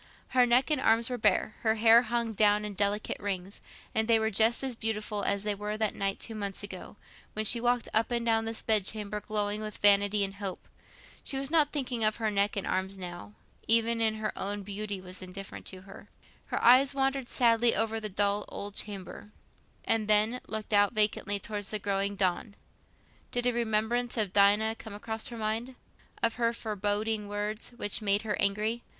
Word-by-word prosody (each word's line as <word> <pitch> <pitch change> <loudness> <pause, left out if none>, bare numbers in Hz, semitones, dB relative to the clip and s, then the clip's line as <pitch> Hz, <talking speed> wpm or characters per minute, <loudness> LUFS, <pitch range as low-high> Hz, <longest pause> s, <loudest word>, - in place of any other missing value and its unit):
Her 250 -1 +4
neck 250 +5 +3
and 295 -3 +2
arms 230 +2 +3
were 250 - -2
bare, 215 0 +2
her 220 -1 +1
hair 225 +1 +6
hung 235 -1 -2
down 210 0 +3
in 210 - -5
delicate 205 +2 -1
rings—and 200 +2 -4
they 230 -1 +5
were 220 0 0
just 225 +5 +3
as 265 -2 -1
beautiful 215 -2 -3
as 200 0 -1
they 210 0 0
were 210 +1 -4
that 215 -1 0
night 195 0 -2
two 225 - -3
months 200 -2 -4
ago, 195 -1 -8 0.4
when 215 0 -1
she 230 +2 +3
walked 245 -1 +1
up 220 +1 +2
and 235 -1 -1
down 225 -1 +2
this 225 0 -4
bed 215 -3 +3
chamber 210 +1 -3
glowing 210 0 -2
with 215 -1 -6
vanity 205 0 +5
and 195 0 -4
hope. 195 -3 -5 0.6
She 270 - -2
was 270 +1 -4
not 310 -3 +4
thinking 250 -5 -2
of 215 0 +3
her 220 -2 -1
neck 200 0 +1
and 200 - -2
arms 190 +1 -2
now; 175 - -8 0.3
even 230 +1 +4 0.2
her 215 0 -3
own 200 +1 -3
beauty 205 0 -4
was 185 +1 -8
indifferent 190 +1 -8
to 185 -1 -5
her. 195 +1 -14 0.4
Her - - -2
eyes 265 +3 +6
wandered 270 -2 0
sadly 235 -1 +3
over 225 +1 0
the 215 -1 -4
dull 205 +1 0
old 205 0 -6
chamber, 205 0 -6 0.6
and 225 -2 +1
then 215 +4 +3
looked 215 0 -5
out 205 +1 +4
vacantly 210 -1 +1
towards 205 -1 -5
the 215 - -1
growing 200 0 -1
dawn. 195 +2 -1 0.8
Did 245 0 -2
a 245 - +2
remembrance 235 +1 0
of 205 -4 0
Dinah 210 +2 +4
come 220 -2 -9
across 220 +1 -4
her 235 - -8
mind? 225 +4 -2 0.5
Of 230 -1 +1
her 235 -1 +1
foreboding 210 -1 -2
words, 210 +3 -4
which 205 -4 0
had 215 - -10
made 200 +1 +2
her 215 -2 -1
angry? 215 +4 0
215 Hz, 195 wpm, -29 LUFS, 205-230 Hz, 0.8 s, hair